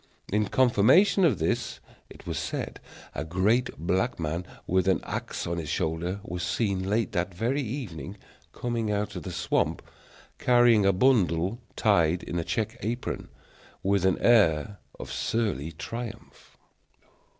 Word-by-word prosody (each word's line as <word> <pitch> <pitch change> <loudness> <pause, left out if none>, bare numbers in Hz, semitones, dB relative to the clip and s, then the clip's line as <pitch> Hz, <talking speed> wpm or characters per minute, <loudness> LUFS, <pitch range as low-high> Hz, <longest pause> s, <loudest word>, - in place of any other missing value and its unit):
In 105 0 +2
confirmation 130 - +4
of 145 - +4
this, 80 +1 -1 0.3
it - - -14
was - - -3
said - - -4 0.3
a 75 - -3
great 100 +10 +1
black 95 +8 0
man, 85 +3 -3 0.2
with 95 0 +1
an 95 - +3
axe - - -4
on 85 0 -2
his 80 -3 -5
shoulder, 85 +6 -1
was 90 +1 -5
seen 95 0 -1
late 115 +3 +1
that 90 -2 -2
very 125 +9 0
evening 105 - -5 0.3
coming 120 -3 -2
out 105 0 -1
of - - -4
the - - -6
swamp, - - 0 0.6
carrying 120 -4 +5
a - - +6
bundle 95 -2 +2 0.2
tied 90 -5 +2
in 85 - -3
a - - -1
check 110 +7 -2
apron, 120 +3 -3 0.6
with 100 -1 +2
an 95 -1 +3
air 100 -4 +4 0.2
of - - -7
surly 95 - -1
triumph. 115 +7 -8
100 Hz, 145 wpm, -27 LUFS, 85-115 Hz, 0.6 s, a